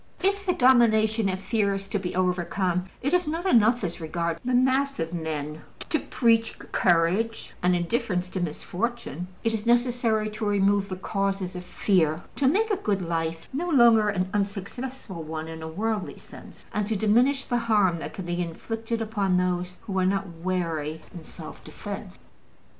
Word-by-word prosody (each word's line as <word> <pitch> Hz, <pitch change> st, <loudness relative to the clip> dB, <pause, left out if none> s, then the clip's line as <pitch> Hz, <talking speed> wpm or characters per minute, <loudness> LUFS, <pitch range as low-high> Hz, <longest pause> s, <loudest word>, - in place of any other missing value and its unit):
If 395 Hz, 0 st, +1 dB
the 360 Hz, -, +4 dB
domination 225 Hz, -, +4 dB
of 185 Hz, 0 st, -2 dB
fear 200 Hz, -1 st, +1 dB
is 195 Hz, 0 st, -5 dB
to 205 Hz, -, 0 dB
be 180 Hz, -2 st, -4 dB
overcome, 180 Hz, 0 st, 0 dB, 0.2 s
it 280 Hz, -, 0 dB
is 360 Hz, -3 st, +3 dB
not 330 Hz, +4 st, -2 dB
enough, 235 Hz, -, +4 dB
as 175 Hz, -1 st, -3 dB
regards 165 Hz, +1 st, -2 dB
the 255 Hz, 0 st, +1 dB
mass 265 Hz, +1 st, +2 dB
of 165 Hz, +1 st, -2 dB
men, 155 Hz, -2 st, -4 dB, 0.3 s
to 315 Hz, -, +2 dB
preach 230 Hz, -2 st, +2 dB
courage 185 Hz, +6 st, +1 dB
and 180 Hz, 0 st, +3 dB
indifference 180 Hz, 0 st, 0 dB
to 185 Hz, -, -3 dB
misfortune: 180 Hz, -, -3 dB, 0.2 s
it 225 Hz, -, +1 dB
is 220 Hz, +1 st, -3 dB
necessary 235 Hz, -3 st, +2 dB
to 215 Hz, +1 st, -6 dB
remove 200 Hz, -1 st, +2 dB
the 185 Hz, -, -3 dB
causes 195 Hz, -1 st, -2 dB
of 180 Hz, -, -5 dB
fear, 175 Hz, -3 st, +1 dB
to 275 Hz, -, +3 dB
make 425 Hz, +10 st, +2 dB
a 405 Hz, -, +2 dB
good 200 Hz, -, -1 dB
life 165 Hz, -1 st, -2 dB
no 340 Hz, +6 st, -2 dB
longer 235 Hz, -7 st, +6 dB
an 185 Hz, -2 st, 0 dB
unsuccessful 205 Hz, +1 st, -4 dB
one 160 Hz, 0 st, -5 dB
in 160 Hz, 0 st, -7 dB
a 160 Hz, -, -5 dB
worldly 210 Hz, +4 st, -2 dB
sense, -, -, -13 dB
and 210 Hz, -1 st, 0 dB
to 220 Hz, -, 0 dB
diminish 245 Hz, +7 st, +3 dB
the 245 Hz, -, 0 dB
harm 205 Hz, -7 st, +2 dB
that -, -, -6 dB
can 190 Hz, -, -5 dB
be 175 Hz, 0 st, -1 dB
inflicted 225 Hz, +7 st, -3 dB
upon 200 Hz, -4 st, +1 dB
those 180 Hz, 0 st, -1 dB
who 200 Hz, -4 st, -2 dB
are 185 Hz, -, +2 dB
not 195 Hz, 0 st, +1 dB, 0.2 s
wary 165 Hz, -4 st, -2 dB
in 170 Hz, -, -9 dB
self -, -, -10 dB
defense. -, -, -7 dB
200 Hz, 175 wpm, -26 LUFS, 175-230 Hz, 0.3 s, longer